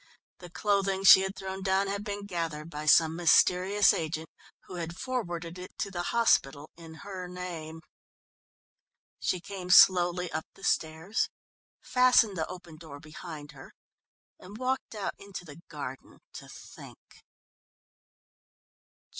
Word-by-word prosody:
The 175 - -11
clothing 195 +1 0
she 190 0 +9
had 190 +1 -3
thrown 190 0 -6
down 190 +1 +1
had 200 +1 -3
been 205 -1 -5
gathered 165 -4 -4
by 150 0 -6
some 160 +1 +5
mysterious 180 +3 +4
agent, 160 0 -4 0.3
who 180 - -10
had 170 0 -5
forwarded 175 -9 -4
it 180 - -11
to 200 - -3
the 175 -2 -3
hospital 150 - +1
in 165 -1 -12
her 190 -3 -6
name. 170 -3 -7 1.4
She 180 - -1
came 180 0 -8
slowly 180 -1 +5
up 155 +1 -4
the 195 - -17
stairs, 160 +6 -1 0.5
fastened 250 -5 +4
the 160 -2 -2
open 175 -3 -10
door 155 -3 -11
behind 155 -1 -10
her, 135 -3 -14 0.7
and 200 +4 -11
walked 255 -1 -3
out 205 - -3
into 195 -2 -9
the 155 +1 -12
garden 140 -4 -8 0.2
to - - -10
think. - - -14
180 Hz, 135 wpm, -29 LUFS, 160-195 Hz, 1.4 s, she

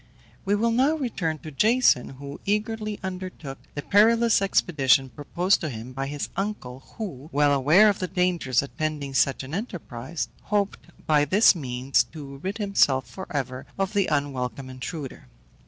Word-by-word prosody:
We 200 +1 +2
will 230 +3 +1
now 265 +7 +3
return 195 - -2
to 155 - -7
Jason, 220 - +3
who 140 +1 -9
eagerly 215 +1 -2
undertook 185 -7 -6 0.2
the 145 - -4
perilous 225 +2 +4
expedition 140 -8 +2
proposed 170 - 0
to 155 - -2
him 120 0 -8
by 135 +1 -3
his 145 0 -4
uncle, 195 -11 -4 0.2
who, 160 - -6
well 145 +1 +3
aware 155 +10 +5
of 205 - +2
the 185 - -2
dangers 180 -8 +1
attending 145 -1 -4
such 135 0 +2
an 135 +3 -9
enterprise, 165 - -5 0.2
hoped 205 -3 -1 0.2
by 150 -2 +4
this 195 +10 +5
means 130 -5 0
to 140 -3 -8
rid 190 +9 -4
himself 145 - +2
for 185 +10 -8
ever 130 -3 -4
of 195 +1 -1
the 200 -2 +2
unwelcome 135 -3 -2
intruder. 135 +2 -7
155 Hz, 155 wpm, -25 LUFS, 135-200 Hz, 0.2 s, aware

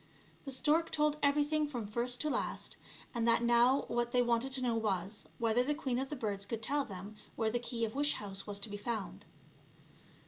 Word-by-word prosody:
The 275 - -4
stork 310 +5 +2
told 300 -1 +2
everything 295 +1 +3
from 245 -6 -4
first 240 +4 0
to 305 - +1
last, - - -2 0.4
and 235 -2 0
that 230 0 +4
now 240 +3 +4
what 240 0 0
they 250 0 +5
wanted 240 +2 +1
to 265 - -1
know 240 -2 +2
was, 200 -5 -1
whether 230 +1 +3
the 295 +3 0
queen 260 -5 -1
of 265 0 -3
the 295 - -3
birds 205 -6 -2
could 225 +1 -4
tell 285 +5 +1
them 200 -1 -8 0.2
where 220 -1 +1
the 240 - 0
key 235 -1 -1
of 220 - -5
wish 290 +1 +2
house 195 -1 -5
was 200 -1 -2
to 205 - -3
be 205 - -4
found. 205 - -4
240 Hz, 210 wpm, -34 LUFS, 215-275 Hz, 0.4 s, they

